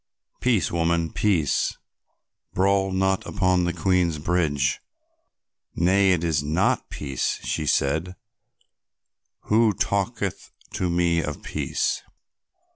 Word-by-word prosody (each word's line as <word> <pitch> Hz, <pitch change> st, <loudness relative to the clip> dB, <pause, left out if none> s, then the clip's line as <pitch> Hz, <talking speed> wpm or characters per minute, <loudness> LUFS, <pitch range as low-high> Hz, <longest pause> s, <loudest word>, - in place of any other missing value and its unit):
"Peace, 120 Hz, -8 st, +1 dB
woman, 85 Hz, -1 st, 0 dB
peace, 90 Hz, -9 st, +1 dB, 0.8 s
brawl 95 Hz, 0 st, +2 dB
not 95 Hz, 0 st, +1 dB
upon 90 Hz, -2 st, +1 dB
the 85 Hz, -, 0 dB
Queen's 90 Hz, -4 st, +1 dB
highway." 80 Hz, -1 st, 0 dB, 1.2 s
"Nay, 95 Hz, +3 st, +3 dB
it 85 Hz, -2 st, -1 dB
is 80 Hz, -4 st, +1 dB
not 80 Hz, +6 st, 0 dB
peace," 70 Hz, -3 st, -2 dB
she 75 Hz, -, -2 dB
said; 80 Hz, +8 st, 0 dB, 1.3 s
"who 110 Hz, 0 st, +3 dB
talketh 100 Hz, +1 st, -2 dB, 0.2 s
to 90 Hz, -, -1 dB
me 85 Hz, -1 st, +2 dB
of 75 Hz, -2 st, -5 dB
peace?" -, -, -2 dB
90 Hz, 105 wpm, -24 LUFS, 80-95 Hz, 1.3 s, Nay